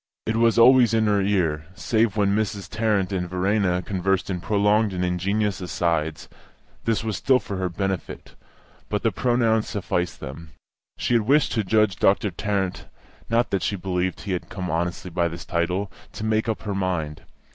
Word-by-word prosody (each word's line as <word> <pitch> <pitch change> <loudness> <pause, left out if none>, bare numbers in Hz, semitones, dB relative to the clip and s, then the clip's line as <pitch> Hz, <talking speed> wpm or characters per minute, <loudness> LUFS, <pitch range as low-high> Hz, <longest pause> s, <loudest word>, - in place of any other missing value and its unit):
It 110 - -1
was 115 0 +3
always 120 -1 +6
in 110 -1 +3
her 105 -1 +2
ear, 85 -6 0
save 110 -2 +1
when 100 -1 +2
Mrs. 105 -3 -2
Tarrant 105 -2 0
and 90 -2 -2
Verena 90 0 +1
conversed 95 0 -1
in 90 -2 -3
prolonged 105 +1 +2
and 90 0 -1
ingenuous 100 +3 -1
asides; 80 -3 -1 0.6
this 115 -1 +1
was 110 -2 -2
still 130 -1 +4
for 100 -6 -5
her 95 -1 -1
benefit, 95 +1 -4 0.6
but - - -1
the - - +2
pronoun 120 -3 +2
sufficed 90 -4 -3
them. 75 +3 -9 0.4
She - - -1
had 115 - +4
wished 145 +1 +4
to 110 - 0
judge 105 -1 +2
Doctor 100 +1 +2
Tarrant 95 0 -2 0.4
(not 115 +1 +1
that 95 - 0
she 100 - -1
believed 90 -1 -2
he 100 - -5
had 90 - -3
come 90 -4 -4
honestly 85 +2 -2
by 85 0 +1
his 85 +1 -8
title), 90 +3 -1 0.2
to - - -6
make 110 +1 +1
up 110 - -3
her 105 - -3
mind. 90 -6 -2
100 Hz, 180 wpm, -24 LUFS, 90-110 Hz, 0.6 s, always